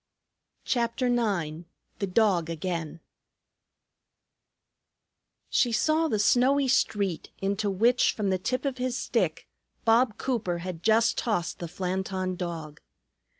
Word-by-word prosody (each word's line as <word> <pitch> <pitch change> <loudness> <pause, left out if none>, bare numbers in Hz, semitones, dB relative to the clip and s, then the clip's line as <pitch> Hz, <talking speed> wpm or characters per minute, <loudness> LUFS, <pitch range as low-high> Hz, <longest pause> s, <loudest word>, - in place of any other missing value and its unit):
CHAPTER 235 +1 0
IX 175 -9 -1 0.3
THE 200 - -1
DOG 185 -4 +2
AGAIN 165 -1 -4 2.5
She 245 -3 +2
saw 310 +8 +2
the 220 - 0
snowy 255 +6 +3
street, 200 -8 0
into 200 +2 -1
which, 230 +6 +3
from 200 -3 -1
the 185 - 0
tip 255 +9 -2
of 265 -2 -2
his 255 0 -1
stick, - - -1 0.4
Bob 225 0 +3
Cooper 220 -9 -1
had 170 -1 -6
just 220 +3 +3
tossed 210 -8 -1
the 170 - -4
Flanton 185 +1 -3
Dog. 165 -4 -6
200 Hz, 115 wpm, -27 LUFS, 180-240 Hz, 2.5 s, snowy